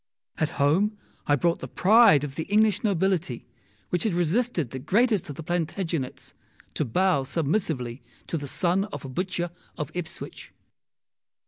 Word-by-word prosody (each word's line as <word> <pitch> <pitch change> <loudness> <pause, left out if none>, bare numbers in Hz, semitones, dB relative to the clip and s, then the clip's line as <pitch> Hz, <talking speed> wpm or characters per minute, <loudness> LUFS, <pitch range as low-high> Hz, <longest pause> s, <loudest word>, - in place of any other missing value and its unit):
At 155 - +1
home 190 +10 +2 0.3
I 145 - +5
brought 170 +4 +1
the - - -6
pride 210 - +6
of 145 -2 -4
the 160 - -4
English 210 0 +3
nobility, 185 - 0 0.4
which 175 - 0
had 210 -6 0
resisted 175 - 0
the 130 - -5
greatest 210 - +2
of 145 - -5
the 165 - -7
Plantagenets, 165 -3 -3 0.4
to - - 0
bow 180 +4 +2
submissively 140 - -1 0.2
to - - -3
the 145 -3 -3
son 185 +6 +1
of 210 - -8
a - - -6
butcher 175 +4 -2 0.3
of 150 - -4
Ipswich. 175 -2 -7
170 Hz, 150 wpm, -26 LUFS, 145-195 Hz, 0.4 s, pride